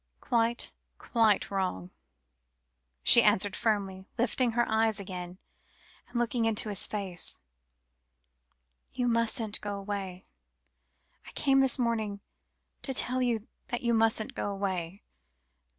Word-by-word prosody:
"Quite, 235 -1 0 0.2
quite 225 -4 +1
wrong," 185 - -3 1.1
she - - +10
answered 195 0 +3
firmly, 195 -4 -2
lifting 240 0 0
her 240 +1 +1
eyes 220 -1 +1
again, 180 -2 -7 0.7
and 245 - -6
looking 235 0 0
into 220 -1 +1
his 200 -3 0
face; 195 -4 -4 1.5
"you 245 -1 -1
mustn't 230 -2 +1
go 205 -1 -4
away. 195 -2 -6 1.0
I - - -10
came 270 -1 +2
this 265 -1 +4
morning 220 -5 -1 0.6
to 265 - -2
tell 255 +1 +2
you 235 -3 -1 0.2
that 240 -1 -4
you 235 -1 +1
mustn't 225 -1 +2
go - - -3
away. 190 -2 -4
220 Hz, 120 wpm, -29 LUFS, 195-235 Hz, 1.5 s, she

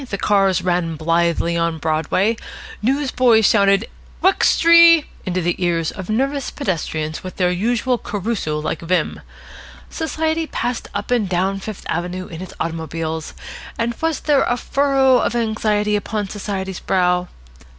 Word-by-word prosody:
The 200 - -3
cars 195 -3 +2
ran 175 -2 0
blithely 170 +1 +1
on 165 -1 0
Broadway. 160 +8 0 0.5
Newsboys 250 -3 +3
shouted 200 +1 +3 0.4
"Wux 380 +1 +4
try!" 335 -1 +7 0.2
into 185 0 0
the 175 +2 -1
ears 165 -2 0
of 190 -2 -8
nervous 270 +5 -1
pedestrians 160 - -3
with 185 - -7
their 180 -1 +1
usual 235 +6 0
Caruso 205 -7 -3
like 150 +1 -3
vim. 175 +2 -1 0.7
Society 320 0 -1
passed 245 -4 -3
up 205 +4 -4
and 225 -6 +1
down 190 +2 0
Fifth 210 0 -8
Avenue 180 +2 -3
in 165 -1 -9
its 185 - -9
automobiles, 160 -1 -4 0.4
and 235 +1 -1
was 325 -3 0
there 290 -3 +3
a 245 - 0
furrow 270 -1 +3
of 240 - -1
anxiety 215 -2 0
upon 210 0 -2
Society's 190 -2 -4
brow? 180 -1 +1
195 Hz, 140 wpm, -20 LUFS, 175-240 Hz, 0.7 s, try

